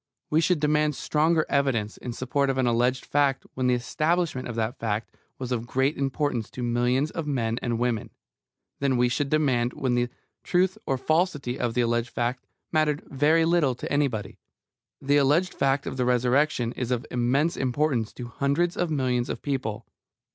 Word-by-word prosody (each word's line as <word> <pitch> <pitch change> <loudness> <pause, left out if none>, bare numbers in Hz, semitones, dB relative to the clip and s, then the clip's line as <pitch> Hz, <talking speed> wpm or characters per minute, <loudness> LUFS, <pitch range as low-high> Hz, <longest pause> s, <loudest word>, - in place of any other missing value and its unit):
We 155 +2 +4
should 175 0 +2
demand 150 0 +2
stronger 155 +3 +1
evidence 130 -7 0
in 125 - -6
support 130 +3 0
of 135 - 0
an 130 - +2
alleged 125 +2 +1
fact 140 -2 +1
when 130 -1 0
the 125 - +4
establishment 155 +3 -1
of 120 - -5
that 115 +3 -2
fact 110 -1 -3 0.2
was 130 -1 -5
of 120 -1 -2
great 135 +4 +1
importance 135 -4 -1
to 125 - -6
millions 125 +4 +1
of 165 -3 -4
men 115 -5 -1
and 120 -2 -1
women, 120 -2 -1 0.7
than 135 -2 +1
we 125 0 +3
should 140 +3 -1
demand 130 -5 +1
when 130 -2 -1
the 120 0 +1 0.3
truth 185 +1 +2
or 135 - +1
falsity 150 -3 0
of 120 -2 -1
the 125 - +3
alleged 120 0 0
fact 120 -1 -3 0.2
mattered 155 -2 +1
very 155 +4 +3
little 165 -6 +2
to - - -5
anybody. 125 -9 -1 0.6
The 140 +1 +2
alleged 150 +6 +3
fact 135 +1 +1
of - - -5
the 125 - +1
Resurrection 125 0 +2
is 125 -1 -4
of 125 -2 -1
immense 130 +7 +1
importance 130 -3 0
to 125 - -7
hundreds 140 +8 0
of 175 - 0
millions 130 -5 0
of - - -5
people. 130 -7 -3
130 Hz, 180 wpm, -26 LUFS, 120-150 Hz, 0.7 s, We